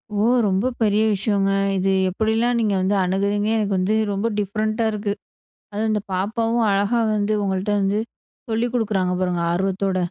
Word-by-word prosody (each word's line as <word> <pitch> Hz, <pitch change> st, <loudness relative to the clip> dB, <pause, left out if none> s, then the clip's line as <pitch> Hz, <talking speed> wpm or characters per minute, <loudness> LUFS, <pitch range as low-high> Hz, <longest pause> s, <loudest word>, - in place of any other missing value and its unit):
ஓ! -, -, -1 dB, 0.3 s
ரொம்ப 195 Hz, +4 st, +1 dB
பெரிய 215 Hz, 0 st, +3 dB
விஷயங்க. 200 Hz, 0 st, 0 dB, 0.3 s
இது 190 Hz, +1 st, 0 dB, 0.2 s
எப்படிலாம் 225 Hz, +4 st, 0 dB
நீங்க 210 Hz, -3 st, +1 dB
வந்து 195 Hz, +2 st, +1 dB
அணுகுகிறீங்க. 200 Hz, +3 st, 0 dB
எனக்கு 205 Hz, -2 st, 0 dB
வந்து 190 Hz, +4 st, +1 dB, 0.2 s
ரொம்ப 200 Hz, +3 st, -1 dB
டிஃப்ரெண்ட்டா 215 Hz, +3 st, -1 dB
இருக்கு. 205 Hz, -1 st, -2 dB, 0.6 s
அதுவும் 220 Hz, +1 st, -1 dB
இந்த 210 Hz, -1 st, 0 dB
பாப்பாவும் 225 Hz, +5 st, 0 dB
அழகா 205 Hz, +4 st, +1 dB
வந்து 210 Hz, +1 st, 0 dB
உங்கள்கிட்ட 195 Hz, +2 st, -1 dB
வந்து 200 Hz, +2 st, +1 dB, 0.5 s
சொல்லிக் 235 Hz, +2 st, -1 dB
குடுக்குறாங்க 200 Hz, -6 st, 0 dB
பாருங்க 180 Hz, -2 st, 0 dB
ஆர்வத்தோட. 190 Hz, +1 st, -1 dB
205 Hz, 150 wpm, -22 LUFS, 195-220 Hz, 0.6 s, பெரிய